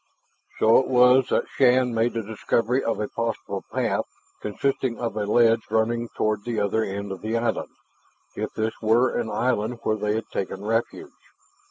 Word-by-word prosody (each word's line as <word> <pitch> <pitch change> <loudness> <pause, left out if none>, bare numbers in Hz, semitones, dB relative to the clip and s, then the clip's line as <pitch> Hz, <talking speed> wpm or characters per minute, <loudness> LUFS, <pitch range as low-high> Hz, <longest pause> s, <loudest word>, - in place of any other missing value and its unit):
So 110 +1 +5
it 130 - -1
was 125 0 +5
that - - +1
Shann 125 -1 +3
made 115 +1 +1
the 115 -1 -2
discovery 115 +4 0
of 115 - -1
a 105 - -1
possible 115 -1 -3
path - - 0 0.4
consisting 130 +3 -1
of 115 -3 -3
a 105 -1 -2
ledge 115 +1 +4
running 115 +2 0
toward 110 -1 0
the 120 -1 -2
other 105 +2 +1
end 100 0 -4
of 95 - -6
the 110 +2 -1
island, 115 0 -1 0.7
if - - -3
this 110 +1 -1
were 115 +3 +3
an 115 -2 -1
island 120 +1 -1
where 110 - 0
they 105 0 -1
had 110 - -3
taken 95 +1 -4
refuge. 115 - -2
115 Hz, 175 wpm, -24 LUFS, 110-120 Hz, 0.7 s, So